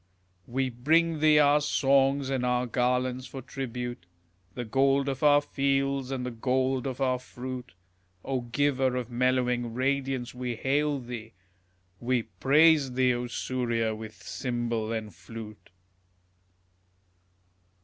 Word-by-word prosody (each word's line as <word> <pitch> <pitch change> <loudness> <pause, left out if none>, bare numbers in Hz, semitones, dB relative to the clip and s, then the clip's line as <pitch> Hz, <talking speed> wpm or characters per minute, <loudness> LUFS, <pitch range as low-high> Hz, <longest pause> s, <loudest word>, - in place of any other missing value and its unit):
We 130 +1 -1
bring 160 +6 +2
thee 155 0 +5
our 145 0 +5
songs 135 -1 +2
and 130 -2 0
our 125 0 +1
garlands 125 +1 0
for 135 - -8
tribute, 125 -7 -5 0.5
The 120 - -4
gold 135 +4 +2
of 135 -2 -3
our 145 -1 +6
fields 135 -2 0
and 130 -2 -3
the 125 - -3
gold 130 +2 0
of 130 0 -5
our 130 -2 +1
fruit; 125 -2 -7 0.5
O 130 -2 -1
giver 130 +1 +1
of 125 -1 -4
mellowing 125 -1 +1
radiance, 135 -1 -1
we 125 -1 -4
hail 145 +4 0
thee, 120 -3 -8 0.7
We 125 -1 0
praise 140 - +4
thee, 125 0 +3
O 120 0 -3
Surya, 120 -2 -1
with 110 -2 -9
cymbal 120 -3 -2
and 110 -3 -4
flute. 105 +4 -10
125 Hz, 130 wpm, -28 LUFS, 120-135 Hz, 0.7 s, our